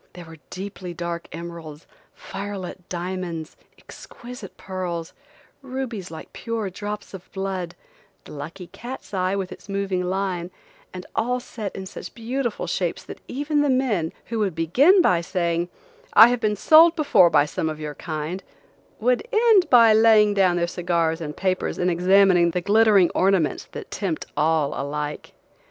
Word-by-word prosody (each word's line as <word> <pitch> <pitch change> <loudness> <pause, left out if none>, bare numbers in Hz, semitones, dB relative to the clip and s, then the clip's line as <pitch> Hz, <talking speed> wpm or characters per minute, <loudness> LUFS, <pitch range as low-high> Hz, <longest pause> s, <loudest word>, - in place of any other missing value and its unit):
There 175 -1 -10
were 165 0 -12
deeply 185 -2 -7
dark 170 0 -4
emeralds, 165 -2 -8 0.3
fire 200 +1 -6
lit 185 -1 -8
diamonds, 175 -3 -5 0.2
exquisite 240 -5 -11
pearls, 180 -3 -5 0.5
rubies 255 -8 -5
like 160 - -10
pure 225 -4 -4
drops 205 +3 -6
of 190 -2 -11
blood, 190 -3 -4 0.5
the - - -13
lucky 165 +5 -8
cat's 245 +5 -9
eye 185 0 0
with 190 -2 -3
its - - -12
moving 195 -2 -1
line, 180 -1 -2 0.4
and 185 0 -8
all 250 +3 0
set 220 -5 -7
in 190 - -6
such - - -9
beautiful 240 +1 -3
shapes - - -2
that - - -10
even 290 +2 0
the 290 - +2
men, 240 -11 +1
who 230 -1 -3
would 195 -6 0
begin 275 - +4
by 175 -2 +3
saying, 170 -1 -1 0.4
"I 225 +2 +9
have 245 0 0
been 215 -2 0
sold 325 - +6
before 215 - +5
by 145 - +4
some 160 +1 -2
of 155 -1 -6
your 150 -1 -5
kind," 155 +4 -5 0.6
would 250 - +1
end 435 -4 +4
by 230 -3 +7
laying 215 -1 +5
down 190 -3 +3
their 170 0 +1
cigars 170 -2 -1
and 150 -2 -6
papers 185 -1 -1
and 180 0 +1
examining 180 0 +4
the 180 +1 -2
glittering 205 -2 +4
ornaments 185 -5 +1
that - - -8
tempt 185 -6 -3
all 155 -2 +1
alike. 150 +1 -4
185 Hz, 160 wpm, -23 LUFS, 170-220 Hz, 0.6 s, I